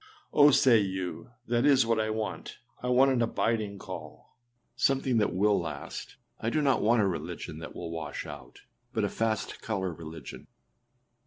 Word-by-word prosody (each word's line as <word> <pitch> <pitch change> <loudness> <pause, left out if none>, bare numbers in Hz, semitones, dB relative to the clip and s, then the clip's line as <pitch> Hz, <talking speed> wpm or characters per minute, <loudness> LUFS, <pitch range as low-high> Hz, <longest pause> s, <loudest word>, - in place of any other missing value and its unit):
â - - -1
âOh!â 145 - +7
say 120 -4 +6
you, 95 +1 -3 0.2
âthat 120 0 +2
is 135 -4 +5
what 115 -1 +1
I 110 0 0
want; 110 0 -4 0.2
I 125 - -3
want 130 +2 +5
an 125 -2 +1
abiding 110 -3 0
call, - - -9 0.4
something 130 -1 +2
that 105 - +2
will 100 +3 +3
last; - - -6 0.2
I 115 - -1
do 155 - +1
not 140 -3 +2
want 110 0 +4
a - - +3
religion 80 -3 -5
that 80 - -8
will 85 -1 -5
wash 80 -1 -5
out, 70 -4 -10 0.3
but - - 0
a - - +1
fast 110 -2 -2
colour 95 -5 -2
religion. 80 -3 -9
110 Hz, 175 wpm, -29 LUFS, 95-120 Hz, 0.4 s, âOh!â